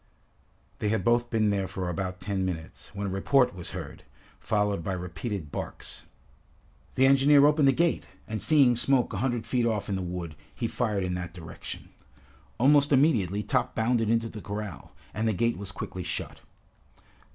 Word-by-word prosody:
They 105 Hz, -, 0 dB
had 105 Hz, -3 st, 0 dB
both 120 Hz, 0 st, +3 dB
been 110 Hz, -2 st, +2 dB
there 100 Hz, -2 st, 0 dB
for 90 Hz, -1 st, -4 dB
about 90 Hz, +2 st, -3 dB
ten 100 Hz, -2 st, -2 dB
minutes, 85 Hz, -4 st, -5 dB
when 100 Hz, 0 st, -3 dB
a -, -, -1 dB
report 125 Hz, +6 st, +3 dB
was 90 Hz, -2 st, -7 dB
heard, -, -, -7 dB, 0.4 s
followed 105 Hz, -4 st, 0 dB
by 95 Hz, -, -2 dB
repeated 90 Hz, -1 st, -5 dB
barks. -, -, -6 dB, 0.9 s
The 130 Hz, -, +5 dB
engineer 140 Hz, +1 st, +6 dB
opened 150 Hz, -1 st, +4 dB
the -, -, +7 dB
gate, 170 Hz, +4 st, +1 dB, 0.2 s
and 110 Hz, -2 st, -4 dB
seeing 130 Hz, -, +5 dB
smoke 125 Hz, +1 st, +2 dB
a -, -, -2 dB
hundred 120 Hz, -2 st, -1 dB
feet 120 Hz, -2 st, +1 dB
off 110 Hz, -3 st, -1 dB
in 100 Hz, -, 0 dB
the 95 Hz, -, -2 dB
wood, 90 Hz, -3 st, -5 dB, 0.2 s
he -, -, -1 dB
fired 105 Hz, -5 st, -1 dB
in 90 Hz, -1 st, -1 dB
that 90 Hz, -1 st, -5 dB
direction. 80 Hz, -2 st, -8 dB, 0.7 s
Almost 145 Hz, +3 st, +4 dB
immediately 115 Hz, -, +3 dB
Top -, -, 0 dB
bounded 115 Hz, -1 st, +1 dB
into 115 Hz, 0 st, +2 dB
the 110 Hz, -2 st, -8 dB
corral, 100 Hz, -7 st, -6 dB, 0.2 s
and 110 Hz, +1 st, -1 dB
the 110 Hz, -, +2 dB
gate 115 Hz, +1 st, 0 dB
was 100 Hz, -1 st, -5 dB
quickly 95 Hz, -1 st, -6 dB
shut. -, -, -5 dB
105 Hz, 175 wpm, -28 LUFS, 95-120 Hz, 0.9 s, the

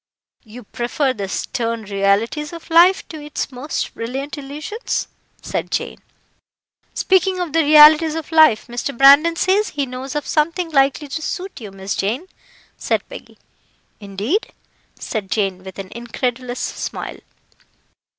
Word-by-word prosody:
"You 240 Hz, +1 st, -12 dB
prefer 245 Hz, +5 st, -1 dB
the 200 Hz, -5 st, -5 dB
stern 230 Hz, +2 st, -3 dB
realities 205 Hz, -, 0 dB
of 335 Hz, -1 st, -11 dB
life 350 Hz, +3 st, +5 dB
to 310 Hz, -2 st, -8 dB
its 295 Hz, -1 st, -4 dB
most 260 Hz, +4 st, -4 dB
brilliant 265 Hz, +6 st, -5 dB
illusions," 300 Hz, -, -4 dB, 0.4 s
said -, -, -3 dB
Jane. -, -, -3 dB, 0.9 s
"Speaking 375 Hz, 0 st, +2 dB
of 345 Hz, -4 st, -3 dB
the 330 Hz, -, +4 dB
realities 305 Hz, +1 st, +7 dB
of 325 Hz, 0 st, -6 dB
life, 315 Hz, -9 st, +5 dB
Mr. 240 Hz, +2 st, -5 dB
Brandon 285 Hz, +5 st, +7 dB
says 390 Hz, +5 st, +2 dB
he 285 Hz, -2 st, -2 dB
knows 255 Hz, +2 st, -7 dB
of 295 Hz, -, -2 dB
something 330 Hz, +3 st, 0 dB
likely 275 Hz, +1 st, +2 dB
to 315 Hz, +3 st, -4 dB
suit 365 Hz, -2 st, -5 dB
you, 210 Hz, -, -7 dB
Miss 195 Hz, 0 st, -5 dB
Jane," 230 Hz, -, -2 dB, 0.5 s
said -, -, -1 dB
Peggy. -, -, -11 dB, 0.6 s
"Indeed!" 210 Hz, -, -2 dB, 0.4 s
said 210 Hz, -4 st, -5 dB
Jane, 195 Hz, -3 st, -1 dB
with 190 Hz, 0 st, -10 dB
an 195 Hz, -1 st, -8 dB
incredulous 245 Hz, +1 st, -4 dB
smile. -, -, -5 dB
275 Hz, 140 wpm, -19 LUFS, 230-320 Hz, 0.9 s, realities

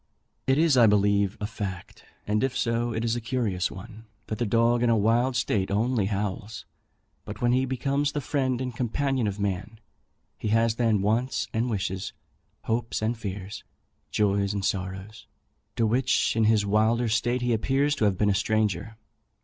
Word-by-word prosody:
It 135 Hz, +1 st, +3 dB
is, 160 Hz, -4 st, +4 dB
I 120 Hz, -2 st, +7 dB
believe, 100 Hz, 0 st, +2 dB
a 105 Hz, -, -2 dB
fact, 100 Hz, -4 st, -7 dB, 0.2 s
and 105 Hz, +3 st, 0 dB
if 135 Hz, -1 st, -1 dB
so, 115 Hz, +1 st, 0 dB
it 115 Hz, 0 st, -2 dB
is 115 Hz, 0 st, +1 dB
a 120 Hz, -, -3 dB
curious 115 Hz, -6 st, -1 dB
one, 110 Hz, +3 st, -11 dB, 0.2 s
that 110 Hz, -, -5 dB
the 120 Hz, -, 0 dB
dog 115 Hz, +2 st, +3 dB
in 120 Hz, -, +3 dB
a 115 Hz, -, +4 dB
wild 120 Hz, +5 st, +2 dB
state 105 Hz, -5 st, 0 dB
only 110 Hz, 0 st, +1 dB
howls; 105 Hz, +1 st, -4 dB, 0.6 s
but -, -, -8 dB
when 120 Hz, 0 st, +2 dB
he 130 Hz, +1 st, +2 dB
becomes 140 Hz, +2 st, 0 dB
the 145 Hz, -, -2 dB
friend 130 Hz, -2 st, -1 dB
and 125 Hz, -2 st, -4 dB
companion 130 Hz, 0 st, 0 dB
of 100 Hz, 0 st, -4 dB
man, 100 Hz, +2 st, -3 dB, 0.6 s
he -, -, -3 dB
has 115 Hz, +1 st, +2 dB
then 110 Hz, -5 st, +2 dB
wants 115 Hz, +5 st, 0 dB
and 115 Hz, +3 st, 0 dB
wishes, 95 Hz, -2 st, -3 dB, 0.5 s
hopes 115 Hz, -1 st, -2 dB
and 115 Hz, +2 st, 0 dB
fears, 100 Hz, -1 st, -6 dB, 0.5 s
joys 100 Hz, -1 st, +1 dB
and 100 Hz, -1 st, -2 dB
sorrows, 95 Hz, +1 st, -4 dB, 0.5 s
to 115 Hz, -, +1 dB
which 125 Hz, +3 st, +1 dB
in 115 Hz, -1 st, +3 dB
his 110 Hz, -1 st, +3 dB
wilder 110 Hz, +4 st, +2 dB
state 120 Hz, +3 st, 0 dB
he 120 Hz, -1 st, +1 dB
appears 135 Hz, +6 st, +1 dB
to 110 Hz, -, +2 dB
have 100 Hz, -3 st, +1 dB
been 105 Hz, +1 st, +2 dB
a -, -, +2 dB
stranger. 110 Hz, +1 st, -1 dB
110 Hz, 180 wpm, -26 LUFS, 100-120 Hz, 0.6 s, I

